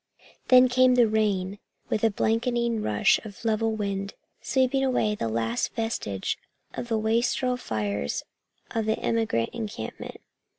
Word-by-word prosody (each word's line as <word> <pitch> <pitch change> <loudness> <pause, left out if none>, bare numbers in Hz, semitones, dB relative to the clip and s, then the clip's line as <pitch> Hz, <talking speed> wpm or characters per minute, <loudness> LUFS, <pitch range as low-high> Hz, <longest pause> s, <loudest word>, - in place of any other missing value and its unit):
Then 255 0 +7
came 255 0 +4
the 240 -2 +5
rain, 205 -3 0 0.3
with 215 - -1
a 225 - +5
blanketing 235 +1 0
rush 105 - +3
of 215 0 -11
level 220 0 +1
wind, 200 -1 -3 0.3
sweeping 260 +2 +1
away 250 -5 +1
the 115 - -2
last 115 +1 -1
vestige 225 - -2 0.3
of - - -5
the 225 -1 0
wastrel 235 +3 +1
fires 105 - -2 0.5
of 225 -1 -1
the 220 - +1
emigrant 220 - 0
encampment. 220 -3 -6
220 Hz, 135 wpm, -26 LUFS, 195-240 Hz, 0.5 s, Then